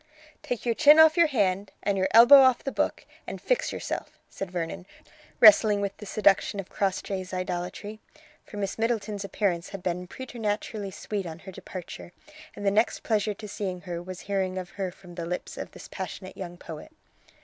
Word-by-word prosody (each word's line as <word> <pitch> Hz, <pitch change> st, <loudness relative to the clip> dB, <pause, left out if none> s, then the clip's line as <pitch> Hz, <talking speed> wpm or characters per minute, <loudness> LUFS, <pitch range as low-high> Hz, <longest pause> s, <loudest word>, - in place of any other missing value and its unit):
"Take 245 Hz, -1 st, -4 dB
your 235 Hz, -, +2 dB
chin 295 Hz, +6 st, +7 dB
off 320 Hz, 0 st, +7 dB
your 340 Hz, -2 st, +5 dB
hand 200 Hz, -7 st, 0 dB
and 200 Hz, -1 st, +1 dB
your 190 Hz, -1 st, +1 dB
elbow 240 Hz, +5 st, +9 dB
off 260 Hz, -2 st, +4 dB
the 275 Hz, -, -3 dB
book, -, -, -1 dB, 0.2 s
and -, -, -6 dB
fix -, -, 0 dB
yourself," -, -, -5 dB
said 195 Hz, -, -5 dB
Vernon, 175 Hz, +1 st, -5 dB, 0.5 s
wrestling 210 Hz, -1 st, +7 dB
with 200 Hz, -1 st, -2 dB
the 210 Hz, -, -10 dB
seduction 200 Hz, 0 st, +2 dB
of 190 Hz, -, -6 dB
Crossjay's 190 Hz, -1 st, -2 dB
idolatry, 185 Hz, +4 st, -4 dB, 0.4 s
for 210 Hz, -, -11 dB
Miss 200 Hz, +1 st, -3 dB
Middleton's 220 Hz, -3 st, -1 dB
appearance 190 Hz, -3 st, -1 dB
had 195 Hz, -2 st, -8 dB
been 180 Hz, 0 st, -2 dB
preternaturally 215 Hz, -3 st, -4 dB
sweet 195 Hz, 0 st, -5 dB
on 160 Hz, -1 st, -7 dB
her 190 Hz, +2 st, -11 dB
departure, 175 Hz, -1 st, -9 dB, 0.4 s
and 205 Hz, -, -7 dB
the 200 Hz, -, +4 dB
next 220 Hz, +3 st, +1 dB
pleasure 210 Hz, -2 st, 0 dB
to 210 Hz, -, -9 dB
seeing 190 Hz, -3 st, -4 dB
her 175 Hz, -2 st, -5 dB
was 185 Hz, 0 st, -8 dB
hearing 190 Hz, -2 st, -2 dB
of 185 Hz, 0 st, -6 dB
her 190 Hz, -2 st, -4 dB
from 180 Hz, -1 st, -15 dB
the 170 Hz, -1 st, -5 dB
lips 180 Hz, +1 st, -5 dB
of -, -, -6 dB
this -, -, -12 dB
passionate 190 Hz, 0 st, -7 dB
young 175 Hz, -2 st, -7 dB
poet. 160 Hz, -, -10 dB
195 Hz, 185 wpm, -27 LUFS, 185-215 Hz, 0.5 s, elbow